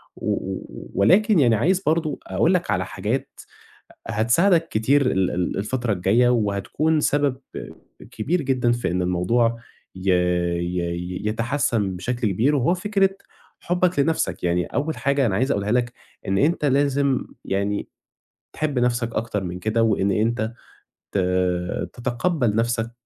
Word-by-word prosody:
و - - -4
و - - -6
ولكن 200 - +4
يعني 120 -5 +4
عايز 180 - +2
برضه 160 -3 0
أقول - - +2
لك - - 0
على - - 0
حاجات - - -4 0.7
هتساعدك 165 - +3
كتير 130 +5 +2
ال 95 -1 +1
ال 90 0 -2
الفترة 120 +2 -1
الجاية، 100 +7 +3
وهتكُون 120 +8 +1
سبب 145 -3 +1 0.7
كبير 155 +9 -1
جدًا 125 -3 +1
في 120 -7 -1
إن 90 +1 0
الموضوع 115 +7 +1 0.4
ي 95 +1 -1
ي 90 0 +1 0.2
ي 90 +1 -5
يتحسِّن 110 -4 0
بشكل 120 +4 -2
كبير 130 +10 +2
وهو 145 +8 +2
فكرة 195 +1 +1 0.5
حُبك 180 -1 0
لنَفْسك، 140 - 0
يعني 90 0 +1
أول 155 +3 -2
حاجة 140 -1 +1
أنا 100 - 0
عايز 130 +5 +1
أقولها 100 +1 0
لك 120 0 +1 0.4
إن 95 0 +1
أنت 150 - +1
لازم 140 -1 +2 0.2
يعني 100 +1 -2 0.6
تحب 150 -4 -2
نَفْسك 120 -1 0
أكتَر 110 -3 -2
من 90 0 -5
كده، 110 +4 0
وإن 100 -3 +2
أنت 110 +2 0 0.6
ت - - -2 0.8
تتقبّل 120 -1 -1
نَفْسك 115 0 0
120 Hz, 140 wpm, -23 LUFS, 100-145 Hz, 0.8 s, ولكن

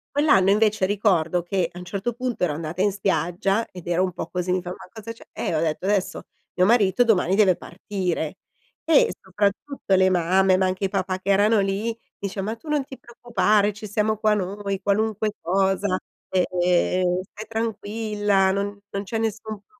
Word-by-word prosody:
Quell'anno, 240 -11 +4
invece, 210 -1 +3
ricordo 185 -4 +1
che, 175 0 -1
a 180 - -10
un 180 - -8
certo 200 +6 -3
punto 250 -3 -3
ero 155 -4 0
andata 165 +4 -3
in 205 0 +2
spiaggia 195 +2 0
ed 180 -2 -11
ero 175 +1 +1
un 185 - -2
po' 165 - -5
così, 180 +1 -2
mi 185 0 0
fa: 175 - -6
"Ma 185 - -9
cosa 225 0 -7
c'è?" 230 - -16
Eh, - - -3
ho 155 - +1
detto: 160 +1 -1
"Adesso, 200 -2 0 0.3
mio 180 - +3
marito 210 0 +4
domani 195 -5 +2
deve 195 -4 +4
partire!" 180 -4 -4 0.5
E, 320 -2 +4
soprattutto 200 +4 -1
le 185 0 +5
mamme, 185 +1 +3
ma 190 0 +2
anche 185 +1 -2
i - - +2
papà 190 -1 -2
che 195 - -2
erano 205 +2 +4
lì, 200 +4 -1 0.2
dice: 200 0 -4
"Ma 215 +4 -3
tu 305 - -14
non 300 -2 +1
ti 265 -1 -11
preoccupare, 215 -3 +1
ci 210 +1 -9
siamo 215 +1 0
qua 215 0 +2
noi, 200 0 -3
qualunque 215 +1 0
cosa, 190 +1 +1 0.3
e 185 -1 +2 0.2
ehm, 180 0 +2
stai 210 +3 -11
tranquilla 210 -3 0
non 200 +1 -2
non 200 - -3
c'è 225 +3 -3
nessun 220 -1 -3
problema." - - -56
195 Hz, 190 wpm, -24 LUFS, 185-215 Hz, 0.5 s, le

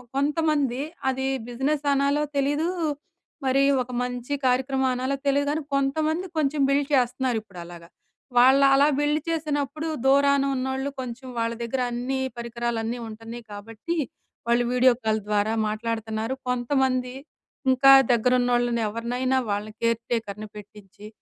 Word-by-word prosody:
కొంతమంది 290 -3 +1 0.3
అది 265 0 -2 0.2
బిజినెస్ 275 +5 -1
అనాలో 280 +2 +2
తెలీదూ, 290 +4 +1 0.8
మరి 270 +1 +3 0.2
ఒక 250 - -6
మంచి 250 +2 -4
కార్యక్రమం 265 +1 +1
అనాలో 260 +2 -1
తెలియదు 285 +1 +2
కానీ, 315 +1 -2
కొంతమంది 310 +5 0
కొంచెం 295 -1 +1
బిల్డ్ 280 +1 +1
చేస్తున్నారు 250 -1 +1
ఇప్పుడలాగా. 175 -3 -11 0.5
వాళ్ళలా 275 +2 +6
బిల్డ్ 295 +1 +1
చేసినప్పుడు 310 -1 -2 0.2
దూరానున్నోళ్ళు 275 -1 +2
కొంచెం 255 +1 -7
వాళ్ళ 230 0 0
దగ్గర 250 +2 -2
అన్నీ 250 +3 -2 0.2
పరికరాలన్నీ 235 0 -3
ఉంటున్నాయి. 225 +2 -9
కాబట్టి 225 +11 -6 0.5
వాళ్ళు 235 +1 +3
వీడియో 250 0 +5
కాల్ 220 0 +1
ద్వారా 210 +1 +1
మాట్లాడుతున్నారు. 220 +1 -3 0.2
కొంతమంది 250 0 0 0.6
ఇంకా 270 +1 +6 0.2
దగ్గరున్నోళ్ళనెవరినైనా 245 +1 +1
వాళ్ళని 210 +1 -3
కేర్ 230 0 +1
టేకర్‌ని 215 -2 -3
పెట్టిచ్చి, 210 0 -12
255 Hz, 115 wpm, -25 LUFS, 230-275 Hz, 0.8 s, వాళ్ళలా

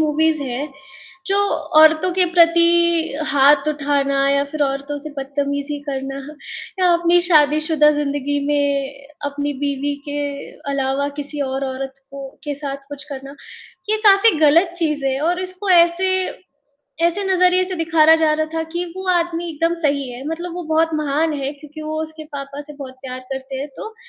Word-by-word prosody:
movies 310 0 +1
हैं, 270 +2 -4 0.5
जो 395 0 +1 0.4
औरतों 315 +3 +5
के 365 +1 +4
प्रति 340 -2 +4
हाथ 285 0 +4
उठाना 280 -2 0
या 280 0 +2
फिर 310 -1 -1
औरतों 280 +1 -3
से 305 +2 -9
बदतमीज़ी 285 +1 -3
करना 270 0 -4 0.6
या 365 - +4
अपनी 345 +1 +3
शादीशुदा 305 -1 +4
ज़िंदगी 285 0 -1
में 285 -1 0 0.4
अपनी 285 0 -3
बीवी 285 0 -1
के 290 - -3 0.6
अलावा 275 +1 -1
किसी 290 0 -6
और 265 +1 -3
औरत 265 0 -5 0.2
को 275 -1 -8 0.2
के 290 - -3
साथ 280 -1 -5
कुछ 285 -1 -7
करना, 275 0 -8 0.6
ये 435 - +3
काफ़ी 395 -3 +6
गलत 330 +4 +4
चीज़ 300 -4 -1
है 265 0 0
और 350 +4 0
इसको 370 +2 -5
ऐसे 345 +1 +4 1.0
ऐसे 370 +4 -1
नज़रिए 365 -1 +3
से 370 0 -5
दिखाया 320 -1 +4
जा 320 -1 +2
रहा 310 0 -1
था 325 - -1
कि 345 +1 -2
वो 375 0 -6
आदमी 345 -1 0
एकदम 330 +2 0
सही 280 -3 0
है, 245 +2 -9
मतलब 340 +2 -5
वो 355 - -5
बहुत 320 +1 +2
महान 305 +1 0
है 275 +1 -2
क्योंकि 300 +1 -11
वो 310 0 -3
उसके 315 0 -9
पापा 280 0 -6
से 295 +1 -11
बहुत 270 -2 -9
प्यार 255 -1 -6
करते 265 0 -6
हैं, 280 +2 -5
तो 440 0 -8
300 Hz, 165 wpm, -19 LUFS, 280-335 Hz, 1.0 s, काफ़ी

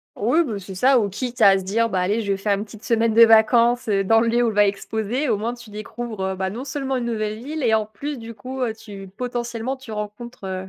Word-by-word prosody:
Oui, 250 +11 +2
bah, 230 -9 -4
c'est 195 0 -9
ça. 255 +6 +4
Ou 205 - 0
quitte 245 +5 -5
à 195 -1 +7
se - - -7
dire: 230 +5 +1
«Bah, 190 -3 0
allez! 205 +5 0
Je 200 -2 -2
vais 195 - 0
faire 200 +1 0
une 205 - -4
petite 215 +1 -14
semaine 230 -2 +1
de 230 +1 +8
vacances, 230 +2 +5
heu, 195 -2 +2
dans 225 +3 +4
le 230 - +1
lieu 240 +1 +2
où - - +2
elle - - -4
va 205 0 +5
exposer», 220 +6 -2
au 215 - +2
moins 230 +3 -2
tu 240 -2 -12
découvres, 215 +1 -6
heu, - - -6
bah, 190 0 -2
non 235 +6 -6
seulement 270 -1 -3
une 245 - -3
nouvelle 215 -2 -2
ville 305 +3 -5
et 225 -2 +3
en 215 -1 0
plus, 280 +7 -6
du 230 -1 -8
coup, 255 +5 -7
heu, 230 -3 0
tu 205 -3 -10
potentiellement 240 +1 -3
tu 260 -3 -11
rencontres, 210 +1 -7
heu, 190 0 -4
225 Hz, 275 wpm, -22 LUFS, 205-240 Hz, -, de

